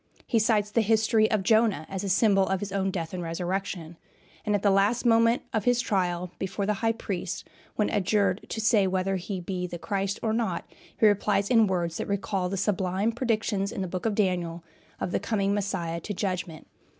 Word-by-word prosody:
He 230 - +2
cites 215 -2 +2
the 230 - +3
history 220 0 +3
of 215 -3 +1
Jonah 220 -6 +3
as 190 0 -4
a 200 - -2
symbol 195 0 +4
of 190 -1 0
his 205 0 -5
own 195 0 0
death 170 -3 -4
and 180 - -3
resurrection; 175 0 -3 0.5
and 210 - +1
at 200 - -1
the 200 - +4
last 200 +6 +2
moment 230 0 +4
of 220 - 0
his 245 -1 +3
trial 180 -6 -1
before 190 +1 -2
the 210 - +1
High 225 -1 +2
Priest, 195 -6 -4 0.3
when 210 - +1
adjured 200 -1 +1
to 225 - -4
say 215 -3 +3
whether 190 +1 0
he 185 +1 -4
be 180 0 -3
the 175 - -6
Christ 195 +4 -2
or 220 -1 +1
not, 230 0 -1 0.3
he 225 - +5
replies 205 0 +2
in 225 -3 +5
words 175 -3 -1
that - - -4
recall 200 -2 -1
the 195 - -3
sublime 190 +2 0
predictions 225 -4 -1
in 205 - -4
the - - -3
Book 185 +4 -3
of 215 - -1
Daniel 175 -4 0 0.4
of 180 - -2
the - - +1
coming 200 -3 0
of - - +1
Messiah 175 -4 -2
to 205 +5 -5
judgment. 180 -5 -3
195 Hz, 210 wpm, -27 LUFS, 185-215 Hz, 0.5 s, he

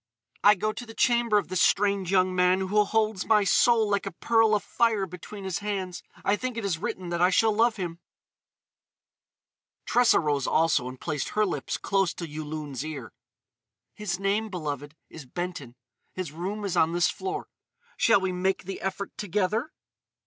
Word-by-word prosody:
I 205 +1 +7
go 215 +3 -1
to 245 - -7
the 225 - -11
chamber 235 -3 +3
of 200 - -1
this 185 -2 0
strange 200 -2 +2
young 185 -1 +3
man 180 +1 +3
who 205 +3 +3
holds 215 -2 0
my 210 -1 +5
soul 225 +3 +4
like 200 -1 0
a - - -3
pearl 225 +4 +3
afire 215 0 +1
between 190 +3 -9
his 190 -2 -2
hands.... 195 -3 -4 0.2
I 200 - +3
think 255 +1 -4
it 230 - -3
it 190 -4 +1
written 180 +1 -4
that 170 0 -2
I 180 - +5
shall 220 +4 +3
love 230 +1 +3
him." 175 -4 -5 1.9
Tressa 245 -1 +4
rose 145 -4 0
also 160 -6 +2
and 130 0 -8
placed 150 -5 -3
her 215 0 +1
lips 150 -8 -3
close 195 -2 0
to 170 - -5
Yulun's 150 -3 -5
ear: 140 -8 -7 0.8
"His 195 -4 -3
name, 205 +3 0
beloved, 150 -5 -5
is 150 -5 -11
Benton. 145 -5 -5 0.4
His 185 -5 -5
room 195 +6 -4
is 195 - -2
on 160 +1 +3
this 175 0 +2
floor. 390 +1 -5 0.5
Shall 225 -4 +4
we 190 -1 -1
make 185 +1 -1
the 190 +1 -6
effort 195 +1 -4
together?" 210 - -1
190 Hz, 175 wpm, -27 LUFS, 170-210 Hz, 1.9 s, I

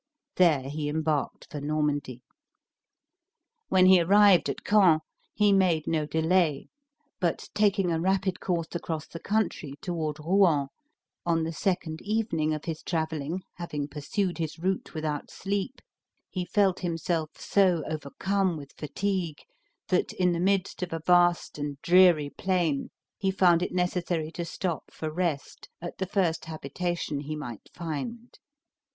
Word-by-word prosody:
There 165 -7 +5
he 145 +1 -3
embarked 155 -1 -2
for 145 - -5
Normandy. 145 -4 -1 1.5
When 185 -1 +5
he 185 -1 +7
arrived 200 +1 +5
at - - -4
Caen, 185 -7 +5 0.3
he 210 -1 +3
made 175 -5 +3
no 155 -2 0
delay, 160 -2 +1 0.5
but 175 -3 -1
taking 200 -3 +2
a 165 -1 0
rapid 190 0 +1
course 170 -3 -1
across 160 -3 -3
the 165 - -9
country 195 -9 -1
toward 160 -4 -3
Rouen, 160 -4 +3 0.5
on 165 -1 +1
the 165 +1 -3
second 175 -3 -2
evening 205 -8 0
of 155 -1 -3
his 160 -1 -4
traveling, 160 +1 -2
having 150 -5 -4
pursued 175 +6 -2
his 160 -1 -3
route 185 +1 -2
without 155 -2 -3
sleep, 200 +6 -3 0.5
he 185 -2 -3
felt 190 +1 +2
himself 165 -2 -2
so 185 -5 +3
overcome 175 +4 -1
with 140 -2 -10
fatigue, 175 0 -2 0.5
that, 180 - +1
in 180 -1 +2
the 170 - -1
midst 190 +1 0
of 180 - -3
a 165 - -3
vast 175 -3 +3
and 145 -1 -4
dreary 175 -5 +5
plain, 175 -7 0 0.3
he 195 - +1
found 180 -3 +4
it 180 - -1
necessary 175 -3 -1
to 170 0 -4
stop 170 -1 -3
for 155 -1 -5
rest 160 -4 -3
at 175 0 -7
the 190 - -1
first 175 -4 0
habitation 160 0 -3
he 150 +2 -5
might 120 -7 -8
find. 175 - -6
170 Hz, 145 wpm, -28 LUFS, 155-185 Hz, 1.5 s, he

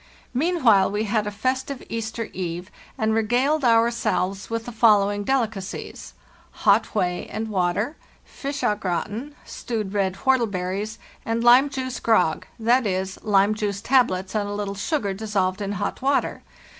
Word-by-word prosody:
Meanwhile 255 - +3
we 205 +2 -1
had 215 0 0
a - - 0
festive 260 +5 -2
Easter 225 0 -3
eve 180 0 -5 0.3
and 220 -3 +1
regaled 250 +7 +1
ourselves 225 -5 +1
with 230 0 -3
the 245 - -6
following 205 -3 +3
delicacies: 215 -6 -3 0.5
hot 210 +2 +4
whey 180 -3 -1
and 220 +1 -3
water, 200 - 0 0.3
fish 280 0 -5
az 210 - +1
gratin, 210 - -3
stewed 215 -5 -4
red 195 -2 0
whortleberries, 210 -4 0 0.3
and 230 +1 -1
lime 250 +4 +7
juice 260 -2 -4
grog 180 -8 +2
(2.c., 210 -6 +1
lime 205 -1 +3
juice 205 -2 -2
tablets 205 -6 +2
and 205 -2 -1
a - - -3
little 205 -1 -3
sugar 200 0 -1
dissolved 195 -2 -1
in 200 0 -2
hot 200 - -3
water). 275 +2 0
215 Hz, 145 wpm, -23 LUFS, 195-240 Hz, 0.5 s, lime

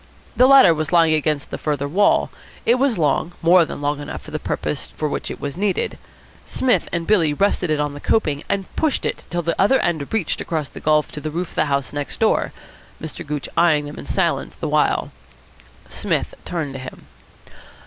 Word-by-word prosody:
The 255 - +6
ladder 270 -10 +8
was 155 0 -3
lying 165 -2 +5
against 155 -2 0
the - - -4
farther 145 -2 -1
wall. 200 +8 +2 0.3
It 240 +2 +3
was 270 -4 +2
long, 155 +2 +1
more 170 +1 +6
than 145 - -7
long 145 0 -1
enough 145 - -7
for 155 - -11
the 155 - -3
purpose 150 - -3
for 155 - -3
which 145 - -3
it - - -6
was 140 -1 -4
needed. 195 0 -1 0.4
Psmith 260 -1 +1
and 170 -1 -2
Billy 165 -8 +3
rested 195 -1 +1
it 155 -1 +1
on 145 -1 -1
the 145 - -8
coping, 150 -5 0
and 195 -1 0
pushed 310 -3 0
it - - -3
till 175 0 -2
the 170 +1 0
other 265 +7 +4
end 155 -5 -1
reached 220 -8 -1
across 155 -4 -3
the - - -10
gulf 155 0 +2
to 150 - -7
the 155 - -3
roof 170 +3 -3
of - - -17
the - - +2
house 140 -2 -1
next 145 -1 -5
door, 220 - +2 0.5
Mr. 160 +2 -6
Gooch 150 -2 -4
eyeing 155 -4 +3
them 145 - -8
in - - -9
silence - - -1
the - - -4
while. - - +1 0.8
Psmith - - -2
turned 160 -6 -3
to 135 - -6
him. 130 0 -10
155 Hz, 210 wpm, -21 LUFS, 145-180 Hz, 0.8 s, ladder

